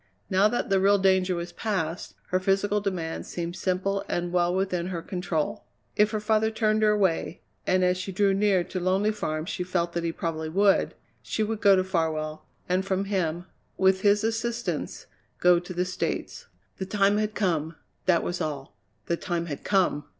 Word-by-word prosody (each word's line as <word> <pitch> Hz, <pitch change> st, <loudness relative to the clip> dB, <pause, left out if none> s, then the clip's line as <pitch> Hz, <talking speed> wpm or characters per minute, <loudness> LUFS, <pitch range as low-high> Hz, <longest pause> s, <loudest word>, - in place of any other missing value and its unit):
Now 190 Hz, +2 st, +5 dB
that 230 Hz, -2 st, -2 dB
the 195 Hz, -, +4 dB
real 200 Hz, +1 st, +5 dB
danger 190 Hz, -1 st, +3 dB
was 170 Hz, 0 st, -5 dB
past, 185 Hz, -5 st, -3 dB
her 185 Hz, -, +2 dB
physical 195 Hz, +2 st, +1 dB
demands 180 Hz, -5 st, -3 dB
seemed 170 Hz, 0 st, -4 dB
simple 195 Hz, +2 st, -1 dB
and 175 Hz, 0 st, -1 dB
well 175 Hz, -1 st, +3 dB
within 180 Hz, -2 st, -1 dB
her 175 Hz, -3 st, -4 dB
control. 175 Hz, -5 st, -2 dB, 0.3 s
If 210 Hz, 0 st, +4 dB
her 215 Hz, -1 st, -2 dB
father 215 Hz, +1 st, +2 dB
turned 220 Hz, -1 st, +1 dB
her 215 Hz, -, +5 dB
away 190 Hz, -5 st, +1 dB, 0.3 s
and 185 Hz, 0 st, +3 dB
as 180 Hz, 0 st, +2 dB
she 195 Hz, -, -4 dB
drew 195 Hz, +1 st, +2 dB
near 195 Hz, -2 st, +3 dB
to 185 Hz, -, -5 dB
Lonely 190 Hz, +4 st, +2 dB
Farm 155 Hz, -7 st, -3 dB
she 180 Hz, -1 st, -3 dB
felt 175 Hz, -1 st, -1 dB
that 170 Hz, -, -2 dB
he 165 Hz, -, 0 dB
probably 160 Hz, -1 st, -3 dB
would 195 Hz, +4 st, +3 dB, 0.3 s
she 220 Hz, -, -2 dB
would 215 Hz, 0 st, -3 dB
go 200 Hz, -2 st, +7 dB
to 185 Hz, -, +2 dB
Farwell, 160 Hz, -4 st, -2 dB, 0.2 s
and 185 Hz, +1 st, +1 dB
from 195 Hz, 0 st, -1 dB
him, 175 Hz, -4 st, -1 dB, 0.3 s
with 190 Hz, 0 st, +3 dB
his 205 Hz, +1 st, +3 dB
assistance, 235 Hz, +1 st, -2 dB, 0.3 s
go 180 Hz, -1 st, +5 dB
to 175 Hz, +1 st, -10 dB
the 180 Hz, 0 st, -1 dB
States. 185 Hz, -, -4 dB, 0.3 s
The 190 Hz, -, -3 dB
time 200 Hz, +1 st, +3 dB
had 215 Hz, 0 st, -2 dB
come 165 Hz, -5 st, 0 dB, 0.3 s
that 175 Hz, -3 st, +4 dB
was 175 Hz, -, -3 dB
all 140 Hz, -8 st, -4 dB, 0.3 s
the 170 Hz, -, -1 dB
time 170 Hz, -2 st, -2 dB
had 145 Hz, -4 st, -6 dB
come! 180 Hz, -7 st, +1 dB
185 Hz, 185 wpm, -26 LUFS, 170-200 Hz, 0.3 s, go